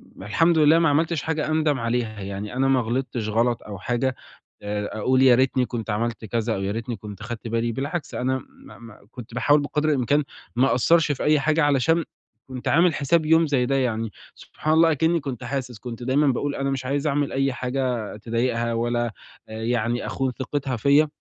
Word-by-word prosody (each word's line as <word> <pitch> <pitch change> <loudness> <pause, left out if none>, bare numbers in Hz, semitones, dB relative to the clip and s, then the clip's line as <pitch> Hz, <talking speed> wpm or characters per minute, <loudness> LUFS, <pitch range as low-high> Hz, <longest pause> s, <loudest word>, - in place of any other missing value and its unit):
م - - -11
الحمد 165 - +2
لله 155 +1 +6
ما 165 -2 +3
عملتش 160 +1 +1
حاجة 160 -1 -1
أندَم 155 -3 +1
عليها 115 -2 -2
يعني، 100 +2 -5
أنا 135 +1 +2
ما 135 -1 +3
غلطتش 120 -1 -2
غلط 115 +2 +1
أو 105 -2 -8
حاجة 120 +5 -1 0.5
آآ، 105 0 -3
أقول 130 +4 +2
يا 130 -2 +7
ريتني 130 0 +2
كنت 115 -2 -5
عملت 115 +2 -2
كذا 115 +1 -1
أو 95 - -4
يا 100 - -1
ريتني 115 +3 -4
كنت 105 -1 -10
خدت 115 0 -6
بالي 115 +1 -1
بالعكس، 140 +7 -4
أنا 130 +1 -1
ما - - -16
ما 115 -3 -13
كنت 120 -2 -10
باحاول 145 +4 +3
بقدْر 150 +2 -1
الإمكان 145 +1 +2 0.3
ما 130 +3 +4
أقصّرش 155 +5 +3
في 140 - -3
أي 150 0 +4
حاجة 155 +3 +2
علشان 145 +4 +2 0.4
كنت 130 -1 -7
عامل 170 +2 +4
حساب 155 +3 +1
يوم 160 +1 +4
زي 135 -4 +1
ده 135 +2 0
يعني، 115 -4 -1 0.2
سبحان 155 - -3
الله 165 +1 +5
أكني 160 +3 +2
كنت 135 -5 -6
حاسس، 125 -3 -4
كنت 120 0 -7
دايمًا 135 +4 +2
باقول 140 +2 0
أنا 135 0 -1
مش 135 -1 -3
عايز 140 +3 -1
أعمل 145 -1 0
أي 135 0 0
حاجة 125 -4 -2
تضايقها 115 +1 -1
ولا 120 0 -1 0.3
يعني 115 +2 -2
أخون 135 -1 -1
ثقتها 135 0 -2
فيَّ، 140 +7 +4
130 Hz, 195 wpm, -24 LUFS, 115-145 Hz, 0.5 s, يا